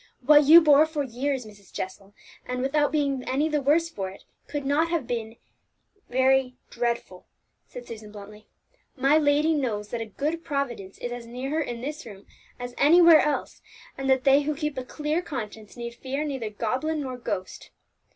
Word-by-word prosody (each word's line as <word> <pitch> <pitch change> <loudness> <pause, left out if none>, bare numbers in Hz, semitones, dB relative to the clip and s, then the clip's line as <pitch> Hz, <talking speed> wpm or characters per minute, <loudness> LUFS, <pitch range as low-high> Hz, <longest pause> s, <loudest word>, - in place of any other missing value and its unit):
"What 295 +1 +7
you 325 +4 +9
bore 305 0 +6
for 310 -2 -2
years, 265 0 -3
Mrs. 205 -2 -16
Jessel, 195 +2 -7 0.3
and 250 0 -3
without 290 +2 +1
being 280 -4 0
any 280 +4 +1
the 300 -2 0
worse 310 +5 +3
for 195 - -5
it, 190 - -14 0.2
could 285 -1 -4
have 315 +1 +1
been 235 -2 -2
nothing 225 +1 -17 0.7
very 260 0 +2 0.2
dreadful," 235 -6 -3 0.4
said - - -10
Susan 215 -2 -10
bluntly. 210 +1 -12 0.5
"My 275 +3 +3
lady 300 +2 +3
knows 220 -8 -2
that 235 0 -4
a 225 - -5
good 305 +10 -3
Providence 245 - -4
is 245 - -5
as 240 -1 -7
near 250 +3 -5
her 315 +1 0
in 240 -5 -5
this 295 +4 -5
room 200 -3 -12 0.3
as 245 0 -7
anywhere 335 +2 +7
else, 295 -2 -2 0.3
and 270 0 -3
that 260 -1 +3
they 275 +1 +5
who 300 +1 -2
keep 300 -1 -3
a - - -5
clear 300 +5 -2
conscience 220 - -7
need 235 0 -6
fear 270 +4 -4
neither 265 -7 -3
goblin 260 +9 -2
nor 260 -2 -5
ghost!" 190 -6 -5
265 Hz, 180 wpm, -26 LUFS, 235-300 Hz, 0.7 s, you